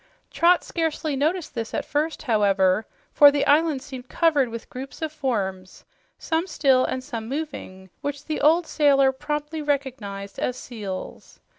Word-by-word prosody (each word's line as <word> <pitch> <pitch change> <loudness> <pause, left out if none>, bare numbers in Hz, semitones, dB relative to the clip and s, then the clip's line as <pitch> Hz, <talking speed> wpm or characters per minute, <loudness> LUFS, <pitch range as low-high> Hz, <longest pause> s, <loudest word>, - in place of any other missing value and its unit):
Trot 345 +1 +4
scarcely 320 -3 -2
noticed 315 +5 -1
this 225 -2 -4
at - - -2
first, 305 +2 -2
however, 205 -4 +2 0.2
for 290 - +8
the 285 0 0
island 295 -2 +3
seemed 260 -3 -9
covered 295 -7 +2
with 230 0 -7
groups 260 +2 -8
of 315 -1 -3
forms, 200 -11 -3 0.3
some 330 +2 -1
still 270 -6 +3
and 260 0 -2
some 230 -5 -6
moving, 260 - -6
which 285 0 -4
the 310 - -3
old 325 +3 +4
sailor 275 -3 +4
promptly 295 +3 -4
recognized 250 -9 -3
as 250 - -1
seals. 205 -7 -7
275 Hz, 150 wpm, -24 LUFS, 230-305 Hz, 0.3 s, for